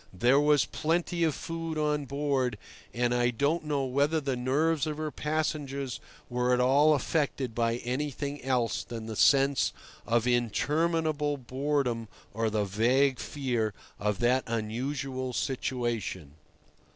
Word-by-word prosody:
There 120 +9 +4
was 150 -1 +4
plenty 170 +2 -1
of 155 -4 +2
food 165 -1 -4
on 150 -1 0
board, 140 -4 0 0.3
and 120 0 0
I 120 0 +2
don't 145 +7 0
know 145 -3 0
whether 140 +5 +1
the 135 -3 -2
nerves 145 +5 +1
of 150 -1 -3
her 155 -1 -3
passengers 145 -4 -2 0.3
were 125 0 +1
at - - -1
all 140 +5 +5
affected 140 -3 -1
by 115 0 +1
anything 140 +3 -3
else 125 -3 0
than 115 -2 -7
the 110 -1 -5
sense 140 +3 +4 0.4
of 115 0 +2
interminable 150 +5 +1
boredom 130 -2 -1 0.3
or 110 +1 0
the 105 -1 0
vague 125 +7 +2
fear 120 -7 -2 0.2
of 105 -1 0
that 125 +2 +3
unusual 130 +4 -3
situation. 120 - -2
135 Hz, 135 wpm, -29 LUFS, 120-150 Hz, 0.4 s, all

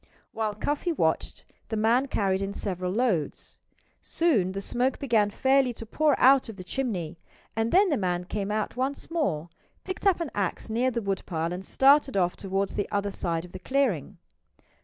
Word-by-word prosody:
While 215 -2 -2
Cuffy 290 - -1
watched, 325 - -1 0.2
the 220 - -2
man 235 +5 +3
carried 195 -6 0
in 195 +1 -3
several 185 -2 -2
loads. 205 - -1 0.4
Soon 225 - +1
the 195 - -3
smoke 250 +6 0
began 225 -6 +2
fairly 265 +3 +2
to 225 - -8
pour 300 +6 +1
out 265 -1 +5
of 225 - -7
the 185 - -8
chimney; 180 -7 -3 0.4
and 225 +1 0
then 385 +2 +5
the 290 - +1
man 180 -2 -1
came 195 +2 -3
out 210 0 -2
once 270 +5 -3
more, 175 - -1 0.3
picked 375 +2 -3
up 375 -3 +4
an 335 -5 -3
axe 200 +2 -2
near 245 +4 +2
the 235 -3 -3
woodpile, 175 -4 -2
and 180 +1 -5
started 275 +1 +4
off 180 -2 +2
toward 195 0 -1
the 205 - -3
other 200 -1 -1
side 170 -3 -2
of 180 - -14
the 185 - -8
clearing. 200 - 0
215 Hz, 180 wpm, -27 LUFS, 190-265 Hz, 0.4 s, out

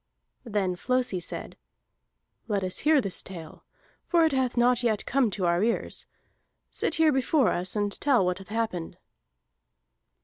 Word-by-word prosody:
Then 200 -5 -1
Flosi 250 -1 0
said: 175 - -6 0.9
"Let 205 -3 -1
us 185 -1 0
hear 305 -1 +4
this 195 -5 -2
tale, 165 -4 -10 0.4
for 335 -2 +4
it 320 - +2
hath 260 -2 0
not 245 0 +3
yet 225 -4 0
come 260 -3 +2
to 190 -2 -2
our 170 +1 +2
ears. 230 +1 -1 0.6
Sit - - -1
here 320 -1 +4
before 265 -1 +2
us, 180 +3 -2
and 205 -1 0
tell 260 -9 +3
what 180 +1 -1
hath 195 - -12
happened." 215 -6 -3
220 Hz, 150 wpm, -27 LUFS, 185-255 Hz, 0.9 s, hear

